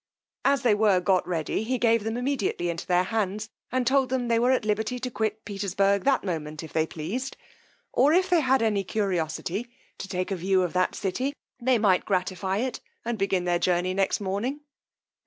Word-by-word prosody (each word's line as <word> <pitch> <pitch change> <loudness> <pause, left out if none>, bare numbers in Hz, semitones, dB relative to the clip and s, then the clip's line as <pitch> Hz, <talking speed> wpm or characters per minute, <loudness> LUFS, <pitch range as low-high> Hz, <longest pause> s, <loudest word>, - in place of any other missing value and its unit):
As 275 -2 +2
they 235 -4 +5
were 205 -3 +4
got 185 0 +2
ready, 170 +1 -1
he 250 +4 -1
gave 230 -2 +3
them 225 +2 -2
immediately 245 -9 -1
into 165 - -6
their 180 0 +3
hands, 210 +1 -2 0.2
and 255 0 0
told 265 +1 +3
them, 250 -2 -1
they 230 -1 +3
were 245 +2 +3
at 255 -4 +2
liberty 215 +3 0
to 250 0 -4
quit 220 -1 -2
Petersburg 200 -1 0
that 275 -2 +3
moment, 155 -5 -4
if 160 - -10
they 160 0 +1
pleased; 210 - -4 0.6
or 275 +4 +4
if 365 +3 +4
they 355 -3 +4
had 265 -3 +3
any 210 -3 +1
curiosity 190 +2 -2 0.3
to - - -5
take 185 0 -3
a - - +1
view 185 +1 +2
of 175 - -2
that 185 0 +1
city, 255 +9 -2 0.3
they 255 0 +3
might 200 -4 +3
gratify 190 0 -1
it, 250 +3 -2 0.3
and 235 -2 -2
begin 195 -2 +1
their 175 -1 +1
journey 180 +1 +1
next 195 0 +1
morning. 210 +9 -2
205 Hz, 195 wpm, -26 LUFS, 185-245 Hz, 0.6 s, they